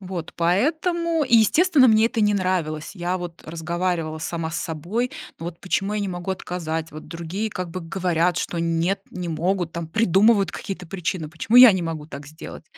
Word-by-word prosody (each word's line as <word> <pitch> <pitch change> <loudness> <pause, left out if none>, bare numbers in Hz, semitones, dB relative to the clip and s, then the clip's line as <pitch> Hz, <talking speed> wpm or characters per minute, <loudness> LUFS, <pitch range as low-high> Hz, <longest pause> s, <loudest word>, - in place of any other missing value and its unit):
Вот. 180 -3 -6
Поэтому 315 - +1
и, 240 -3 +5
естественно, 275 - +5
мне 220 +1 +5
это 230 -2 -2
не 210 -1 +3
нравилось. 175 -5 -1
Я, 180 0 -2
вот, 175 -1 -8
разговаривала 170 0 -2
сама 165 0 -3
с 165 - -3
собой: 180 +11 -2 0.3
"Ну, 165 - -6
вот 170 -1 -7
почему 195 +2 -1
я 210 - -1
не 200 - -2
могу 175 0 -4
отказать, 165 -3 -4
вот 155 - -9
другие 170 +6 -4
как 180 -3 -5
бы 185 - -5
говорят, 175 0 0
что 170 - -3
нет, 170 +3 0
не 180 -1 -5
могут, 175 +2 -1
там, 170 -1 -4
придумывают 200 0 +3
какие-то 185 -2 -6
причины, 170 -2 -3
почему 215 +9 0
я 250 -3 +11
не 190 - -1
могу 160 -2 -4
так 140 -2 -9
сделать?" 155 +2 -10
180 Hz, 190 wpm, -23 LUFS, 165-205 Hz, 0.3 s, я